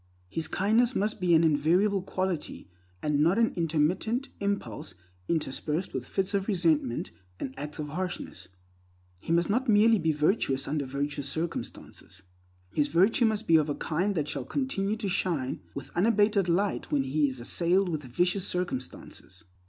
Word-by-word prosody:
His 160 - -2
kindness 225 +6 +2
must 210 0 -1
be 175 -2 +4
an 160 - +5
invariable 170 +6 +3
quality, 185 -3 -3 0.4
and 150 -1 +1
not 170 +7 +3
an 230 -1 +3
intermittent 175 - 0
impulse 200 - -3 0.3
interspersed 155 +2 -2
with 130 -1 -4
fits 195 +1 -1
of 195 -1 0
resentment 165 - +1 0.3
and 130 - -4
acts 150 +1 -6
of 150 -2 -4
harshness. 180 +3 -5 0.7
He 160 - -5
must 170 +1 +3
not 245 +5 0
merely 220 +1 +5
be 160 -1 +1
virtuous 150 -3 +1
under 145 -2 -2
virtuous 140 +1 -3
circumstances; 155 - -6 0.5
his 150 -1 +2
virtue 190 - +3
must 220 0 0
be 165 -4 +6
of 155 -1 +1
a 145 - -1
kind 185 +6 -1
that 150 -3 -1
shall 140 -3 -3
continue 215 - -1
to 215 -2 -3
shine 170 -8 -1
with 140 - -7
unabated 205 -1 +2
light 195 +4 0
when 140 -2 +2
he 145 +2 +1
is 130 -1 -7
assailed 175 +10 +2
with 155 -4 -2
vicious 180 +9 0
circumstances. 130 - -5
170 Hz, 160 wpm, -28 LUFS, 150-200 Hz, 0.7 s, be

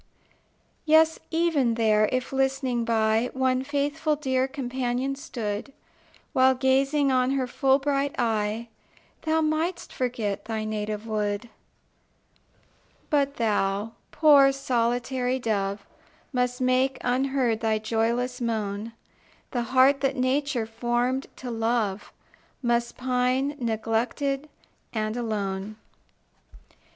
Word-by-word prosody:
Yes, 320 +1 +4
even 320 -8 +2
there, 215 -2 +3
if, 255 +1 -2
listening 265 -2 0
by, 225 +1 +2
One 260 0 +1
faithful 290 +2 0
dear 260 -3 0
companion 260 -1 -2
stood, 240 -4 -5 0.6
While 260 0 +5
gazing 270 +2 +2
on 255 +1 +2
her 270 -2 0
full 265 +2 +2
bright 280 0 -1
eye, 225 -1 -1 0.5
Thou 320 0 +1
mightst 320 +3 -1
forget 230 -6 -2
thy 220 -1 -3
native 215 0 -3
wood 210 +1 -2 1.6
But 280 -1 +2
thou, 210 -1 0 0.2
poor 290 -3 +6
solitary 250 0 0
dove, 205 -4 -2 0.5
Must 250 0 0
make, 255 +1 +2
unheard, 255 -2 +1
thy 220 -1 +1
joyless 235 +3 -1
moan; 220 -1 -2 0.6
The 245 - -1
heart 265 +2 +5
that 270 -1 +1
Nature 260 -1 0
formed 240 +3 -1
to 250 -2 -6
love 225 -3 -1 0.5
Must 235 0 0
pine, 255 +2 0
neglected, 240 +5 -1 0.4
and 215 -1 -1
alone. 210 -3 -3
250 Hz, 105 wpm, -26 LUFS, 225-270 Hz, 1.6 s, poor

